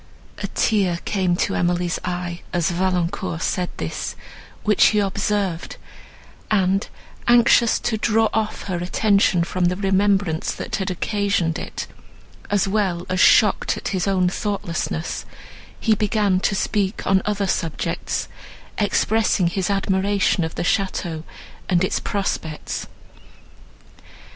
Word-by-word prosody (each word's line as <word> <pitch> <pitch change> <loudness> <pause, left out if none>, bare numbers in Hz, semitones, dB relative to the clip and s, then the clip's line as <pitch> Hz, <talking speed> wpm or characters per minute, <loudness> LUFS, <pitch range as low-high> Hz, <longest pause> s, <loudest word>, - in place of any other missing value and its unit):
A - - -2
tear 195 -6 +1
came 185 -4 +1
to - - 0
Emily's 175 0 0
eye, 175 -1 -4
as 175 -1 +1
Valancourt 180 -1 -1
said 180 -1 -1
this, 80 - -4 0.5
which 210 -1 +4
he 210 - +2
observed; 200 -3 -1 0.7
and, 195 -1 +2 0.4
anxious 240 -1 +5
to 220 - 0
draw 225 +1 +3
off 220 -1 -1
her 185 -3 -3
attention 185 0 +2
from 180 +1 -1
the 180 +1 +2
remembrance 195 -3 +1
that - - -4
had 190 -2 -2
occasioned 200 -2 0
it, - - -5 0.6
as 200 -1 +2
well 190 -4 0
as 185 0 0
shocked - - +4
at - - -4
his 190 -1 -1
own 185 -2 +2
thoughtlessness, 180 -4 -3 0.6
he 220 - +3
began 210 -2 +1
to 195 - 0
speak 200 0 -1
on 190 0 +3
other 205 -1 -1
subjects, 165 -4 -2 0.5
expressing 215 -1 +2
his 185 +1 -2
admiration 195 -1 +1
of 160 - -4
the - - -2
château, 175 -3 -1 0.5
and 180 -1 +3
its 190 - 0
prospects. 165 -6 -3
190 Hz, 125 wpm, -22 LUFS, 175-205 Hz, 0.7 s, anxious